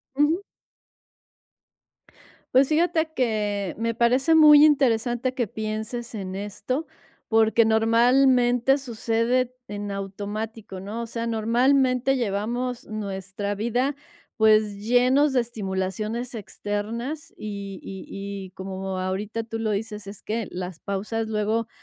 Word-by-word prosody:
Ujú. 310 Hz, +7 st, +2 dB, 2.1 s
Pues 265 Hz, +1 st, +6 dB
fíjate 320 Hz, 0 st, +2 dB
que 210 Hz, -5 st, -1 dB
me 230 Hz, 0 st, -1 dB
parece 255 Hz, +7 st, +3 dB
muy 300 Hz, -2 st, +9 dB
interesante 250 Hz, -3 st, +2 dB
que 250 Hz, -2 st, -1 dB
pienses 220 Hz, +3 st, -4 dB
en 190 Hz, -3 st, -5 dB
esto 210 Hz, +9 st, -3 dB, 0.4 s
porque 225 Hz, +1 st, +4 dB
normalmente 245 Hz, +3 st, +4 dB
sucede 245 Hz, 0 st, 0 dB
en 205 Hz, 0 st, -5 dB
automático, 205 Hz, +1 st, -5 dB
¿no? 205 Hz, +5 st, -5 dB
O 235 Hz, -, -3 dB
sea, 230 Hz, 0 st, -4 dB
normalmente 255 Hz, +3 st, +2 dB
llevamos 240 Hz, +3 st, -2 dB
nuestra 200 Hz, -1 st, -4 dB
vida 245 Hz, +6 st, 0 dB, 0.4 s
pues 215 Hz, -1 st, +4 dB
llenos 255 Hz, +5 st, +4 dB
de 255 Hz, -, +3 dB
estimulaciones 215 Hz, +2 st, -3 dB
externas 225 Hz, +7 st, -4 dB
y 200 Hz, -2 st, -6 dB
y 190 Hz, -1 st, -8 dB, 0.4 s
y -, -, -14 dB
como 190 Hz, 0 st, -5 dB
ahorita 200 Hz, +4 st, -3 dB
tú 225 Hz, 0 st, -5 dB
lo 220 Hz, -1 st, 0 dB
dices, 210 Hz, 0 st, -3 dB
es 200 Hz, 0 st, -9 dB
que 220 Hz, 0 st, -2 dB
las 180 Hz, -1 st, -6 dB
pausas 215 Hz, +3 st, -3 dB
luego 220 Hz, +1 st, 0 dB
225 Hz, 115 wpm, -25 LUFS, 205-250 Hz, 2.1 s, muy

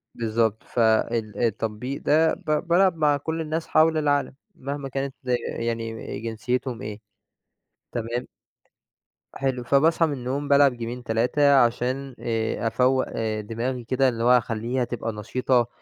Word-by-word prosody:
بالضبط، 110 Hz, -1 st, 0 dB
فال 110 Hz, -2 st, +1 dB
التطبيق 115 Hz, +4 st, -2 dB
ده 160 Hz, +2 st, +3 dB
ب 155 Hz, -, -5 dB, 0.2 s
بالعب 180 Hz, +1 st, +4 dB
مع 150 Hz, -2 st, +3 dB
كل 160 Hz, +3 st, -3 dB
الناس 160 Hz, +1 st, -3 dB
حَول 160 Hz, 0 st, +4 dB
العالم، 145 Hz, -3 st, +1 dB, 0.2 s
مهما 140 Hz, 0 st, -5 dB
كانت 135 Hz, 0 st, -3 dB, 0.5 s
يعني 115 Hz, -1 st, -4 dB
جنسيتهم 115 Hz, +2 st, -3 dB
إيه. 105 Hz, 0 st, -6 dB, 0.9 s
تمام. 120 Hz, +1 st, -3 dB, 1.1 s
حلو. 130 Hz, -2 st, -1 dB
فباصحَى 160 Hz, +6 st, +3 dB
من 150 Hz, -, -2 dB
النوم 135 Hz, +3 st, -3 dB
بالعب 140 Hz, -2 st, +5 dB
جيمين، 120 Hz, +1 st, -5 dB
3 125 Hz, +6 st, +3 dB
عشان 130 Hz, +2 st, +1 dB
آآ 115 Hz, 0 st, -1 dB
أفوّق 130 Hz, +3 st, +2 dB
آآ 110 Hz, -1 st, -2 dB
دماغي 120 Hz, +3 st, -3 dB
كده، 130 Hz, +2 st, +2 dB
اللي 115 Hz, -1 st, -3 dB
هو 125 Hz, +1 st, +6 dB
أخلّيها 120 Hz, +2 st, -1 dB
تبقى 115 Hz, -1 st, -3 dB
نشيطة، 120 Hz, +3 st, +1 dB
125 Hz, 135 wpm, -24 LUFS, 115-140 Hz, 1.1 s, هو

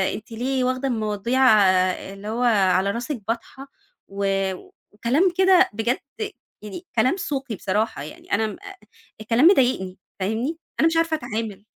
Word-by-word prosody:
أنتِ 215 Hz, +2 st, -10 dB
ليه 255 Hz, +3 st, -1 dB
واخدة 255 Hz, +2 st, -1 dB
المواضيع 220 Hz, +2 st, -1 dB, 0.7 s
اللي 200 Hz, +1 st, -10 dB
هو 230 Hz, +3 st, -2 dB
على 195 Hz, -4 st, +3 dB
راسِك 240 Hz, +3 st, -4 dB
باطحة؟" 240 Hz, +4 st, -5 dB, 0.4 s
و 200 Hz, 0 st, -4 dB, 0.7 s
وكلام 275 Hz, -, +2 dB
كده 375 Hz, -1 st, +5 dB
بجد 225 Hz, +4 st, -1 dB, 0.6 s
يعني 210 Hz, -, -8 dB
كلام 255 Hz, -, +2 dB
سوقي 270 Hz, -, -3 dB
بصراحة 205 Hz, -4 st, -2 dB
يعني. 150 Hz, -, -12 dB
أنا 220 Hz, +2 st, +2 dB
م 215 Hz, -, -6 dB, 0.7 s
الكلام 230 Hz, +6 st, +2 dB
مضايقني، 245 Hz, -, +2 dB, 0.2 s
فاهمني 225 Hz, -, -2 dB, 0.2 s
أنا 320 Hz, -, +5 dB
مش 325 Hz, -, 0 dB
عارفة 330 Hz, -1 st, +2 dB
أتعامل. 220 Hz, -5 st, -5 dB
230 Hz, 135 wpm, -23 LUFS, 210-270 Hz, 0.7 s, كده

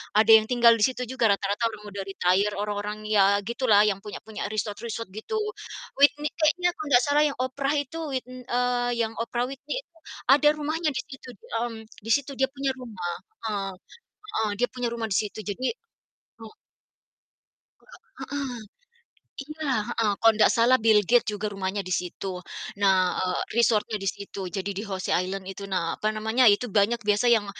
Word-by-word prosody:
ada 220 Hz, +1 st, +5 dB
yang 220 Hz, -1 st, +8 dB
tinggal 240 Hz, -1 st, +5 dB
di -, -, +2 dB
situ 255 Hz, -1 st, -2 dB
juga 255 Hz, -2 st, +1 dB
rata-rata 200 Hz, +3 st, 0 dB
orang 215 Hz, -2 st, -8 dB
udah 200 Hz, 0 st, -5 dB
retire 195 Hz, +2 st, +1 dB
orang-orang 205 Hz, +1 st, -3 dB
ya 200 Hz, -1 st, +5 dB
gitu 240 Hz, +2 st, -2 dB
lah, 205 Hz, -2 st, +7 dB
yang 200 Hz, -2 st, 0 dB
punya 210 Hz, +1 st, -8 dB
punya 220 Hz, -2 st, -5 dB
resort-resort 215 Hz, +1 st, -4 dB
gitu. 220 Hz, -, -6 dB, 0.6 s
Whitney 290 Hz, +1 st, +4 dB
kayaknya 355 Hz, +3 st, +3 dB
kalau 310 Hz, -, -6 dB
nggak 245 Hz, -1 st, +6 dB
salah 290 Hz, +2 st, +3 dB
yang 285 Hz, -, -4 dB
Oprah 275 Hz, +3 st, -1 dB
itu 290 Hz, +2 st, -3 dB, 0.2 s
wit 255 Hz, -, -2 dB
n 255 Hz, 0 st, -10 dB
eee, 245 Hz, 0 st, +1 dB, 0.2 s
yang 220 Hz, -, -6 dB
Oprah 240 Hz, +1 st, -1 dB
Whitney 275 Hz, +2 st, -6 dB
itu 335 Hz, -6 st, -30 dB, 0.4 s
ada 295 Hz, +1 st, +5 dB
rumahnya 310 Hz, +2 st, -2 dB
di -, -, -1 dB
situ, 265 Hz, -3 st, -11 dB, 0.3 s
mmm, 235 Hz, -1 st, -3 dB, 0.3 s
di 225 Hz, -, -2 dB
situ 285 Hz, 0 st, -3 dB
dia 265 Hz, -, +3 dB
punya 275 Hz, -1 st, -1 dB
rumah, 190 Hz, -8 st, -5 dB, 0.3 s
heeh 200 Hz, -2 st, -2 dB, 0.5 s
heeh, 220 Hz, -, -1 dB
dia 245 Hz, -, +4 dB
punya 245 Hz, -1 st, -2 dB
rumah 230 Hz, -1 st, -3 dB
di 190 Hz, -, +1 dB
situ, 210 Hz, 0 st, -2 dB
jadi 210 Hz, +5 st, -4 dB, 0.7 s
hmm. 225 Hz, -1 st, -11 dB, 1.3 s
Enggak 475 Hz, -2 st, -17 dB, 0.2 s
heeh. 275 Hz, -4 st, -4 dB, 0.8 s
Iya, 305 Hz, +1 st, -4 dB, 0.2 s
heeh, 220 Hz, -2 st, +1 dB
kalau 225 Hz, 0 st, +6 dB
ndak 210 Hz, 0 st, +5 dB
salah 235 Hz, +3 st, +4 dB
Bill 220 Hz, -1 st, +6 dB
Gates 240 Hz, +1 st, +3 dB
juga 210 Hz, 0 st, -3 dB
rumahnya 195 Hz, 0 st, -3 dB
di 185 Hz, -, 0 dB
situ. 180 Hz, +1 st, -4 dB, 0.4 s
Nah, 185 Hz, -2 st, +4 dB
eee, 185 Hz, -1 st, -1 dB
resort-nya 225 Hz, -2 st, +2 dB
di 195 Hz, -, 0 dB
situ, 195 Hz, -2 st, -7 dB
jadi 195 Hz, +1 st, -4 dB
di 200 Hz, -, -4 dB
José 190 Hz, -3 st, -2 dB
Island 185 Hz, +1 st, -2 dB
itu, 195 Hz, +1 st, -7 dB
nah, 170 Hz, -3 st, -1 dB
apa 215 Hz, -, -1 dB
namanya, 220 Hz, +4 st, +1 dB
itu 205 Hz, +5 st, +1 dB
banyak 215 Hz, +1 st, +2 dB
biasa 210 Hz, +4 st, +3 dB
yang, 220 Hz, -3 st, +4 dB
225 Hz, 180 wpm, -26 LUFS, 205-255 Hz, 1.3 s, yang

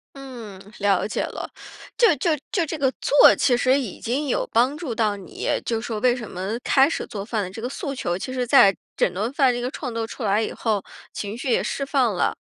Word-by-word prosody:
嗯， 240 Hz, -8 st, -9 dB, 0.2 s
了 200 Hz, -2 st, +2 dB
解 215 Hz, -, -2 dB
了。 -, -, -6 dB, 0.5 s
就 470 Hz, -, +5 dB
就 350 Hz, -, 0 dB, 0.2 s
就 360 Hz, -, +1 dB
这 315 Hz, -, -4 dB
个 270 Hz, -2 st, +2 dB
做 290 Hz, -, +7 dB
其 245 Hz, -3 st, +2 dB
实 260 Hz, +3 st, +3 dB
已 235 Hz, -9 st, -6 dB
经 275 Hz, +5 st, -2 dB
有 -, -, 0 dB
帮 255 Hz, +6 st, +3 dB
助 290 Hz, -9 st, -4 dB
到 215 Hz, -2 st, +1 dB
你， 185 Hz, -4 st, -7 dB, 0.2 s
就 225 Hz, -1 st, -1 dB
说 225 Hz, -3 st, -4 dB
为 250 Hz, -1 st, +4 dB
什 235 Hz, -4 st, -7 dB
么 190 Hz, +5 st, -4 dB
开 270 Hz, 0 st, +5 dB
始 330 Hz, -, -3 dB
做 200 Hz, -4 st, -6 dB
饭 220 Hz, -1 st, -1 dB
的 185 Hz, -, -5 dB
这 200 Hz, -, -9 dB
个 245 Hz, -, -2 dB
诉 280 Hz, 0 st, -5 dB
求 175 Hz, -6 st, -2 dB
其 255 Hz, -, -5 dB
实 250 Hz, -1 st, -1 dB
在 195 Hz, -4 st, +6 dB, 0.2 s
整 180 Hz, -, +2 dB
顿 210 Hz, +7 st, -2 dB
饭 270 Hz, -3 st, +4 dB
这 245 Hz, -, -3 dB
个 250 Hz, +2 st, -3 dB
创 255 Hz, -7 st, -5 dB
作 230 Hz, -1 st, -2 dB
出 240 Hz, -, -10 dB
来 205 Hz, +1 st, +2 dB
以 -, -, -2 dB
后， 215 Hz, -4 st, -1 dB, 0.3 s
情 205 Hz, +1 st, -5 dB
绪 250 Hz, +2 st, -4 dB
也 -, -, +2 dB
释 280 Hz, -, -2 dB
放 265 Hz, -5 st, +1 dB
了， -, -, 0 dB
240 Hz, 255 characters per minute, -23 LUFS, 210-270 Hz, 0.5 s, 做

